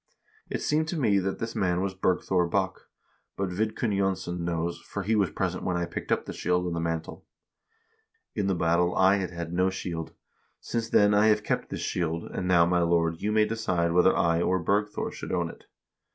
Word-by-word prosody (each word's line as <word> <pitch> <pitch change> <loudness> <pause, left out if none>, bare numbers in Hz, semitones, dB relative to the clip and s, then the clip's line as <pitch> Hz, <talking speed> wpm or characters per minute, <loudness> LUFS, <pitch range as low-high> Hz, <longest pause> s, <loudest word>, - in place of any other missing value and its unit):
It - - -3
seemed 155 +1 +1
to 165 0 -2
me 105 -7 +3
that 95 +1 -2
this 115 0 -5
man 90 -5 +1
was 95 0 -1
Bergthor 90 -1 +1
Bokk; 95 +1 -1 0.5
but 95 -1 -1
Vidkun 110 +2 -1
Jonsson 95 -2 -1
knows, 85 0 -2
for 100 - -6
he 110 +3 +1
was 100 -4 +2
present - - -2
when 90 - 0
I 85 - 0
picked 85 - -6
up - - +1
the - - -6
shield 90 0 0
and 85 -1 -2
the - - -1
mantle. 80 -1 -3 1.1
In 100 - -1
the 95 - +1
battle 85 +1 +2
I 95 +2 +5
had 95 -2 -2
had 85 -1 -6
no 90 +1 +2
shield. 85 -3 -5 0.5
Since 115 -1 -3
then 105 -2 +5
I 105 +1 +5
have 105 -1 +3
kept - - -2
this - - -5
shield, 85 -1 -2
and 90 - -3
now, 85 -2 +5
my 90 0 +2
lord, 85 -1 +1
you 105 - 0
may 110 0 +4
decide 90 -7 0
whether 90 +1 +4
I 85 0 +2
or 95 +1 +2
Bergthor 105 +4 -1
should - - -7
own - - -1
it.' - - -18
90 Hz, 210 wpm, -27 LUFS, 85-105 Hz, 1.1 s, I